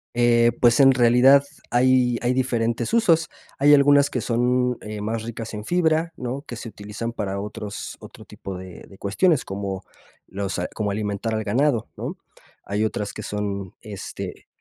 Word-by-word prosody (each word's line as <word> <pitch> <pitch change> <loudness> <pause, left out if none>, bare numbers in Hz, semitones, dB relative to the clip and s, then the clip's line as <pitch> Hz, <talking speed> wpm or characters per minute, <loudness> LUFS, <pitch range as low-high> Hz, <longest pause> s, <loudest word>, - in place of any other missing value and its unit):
Eh, 120 -1 +4
pues, 120 +2 +5
en 135 -1 +8
realidad 125 +3 +6 0.3
hay 125 -1 +3
hay 120 +1 +1
diferentes 120 - -1
usos. 165 -9 +3 0.3
Hay 145 +2 +6
algunas 145 0 +5
que 125 - -2
son, 125 +1 +1
eh, 105 -1 -6
más 110 +1 -2
ricas 115 -1 -6
en 105 - -6
fibra, 165 0 +1
¿no? 130 +3 -4
Que 120 - -8
se 115 - -7
utilizan 105 +3 -6
para 100 -3 -3
otros 105 0 -6
otro - - -12
tipo 95 -1 -8
de 90 -1 -10
de 95 - -15
cuestiones, 150 - +2
como 95 -1 -4 0.5
los, 95 -2 -4
ah, 90 - -1
como 105 -2 -1
alimentar 105 +2 -2
al 110 0 -1
ganado, 120 +2 +1
¿no? - - -4 0.5
Hay 105 +2 -1
otras 105 -1 -3
que 110 - -7
son, 100 -2 -4
este, 105 -4 -8
115 Hz, 170 wpm, -23 LUFS, 105-130 Hz, 0.5 s, en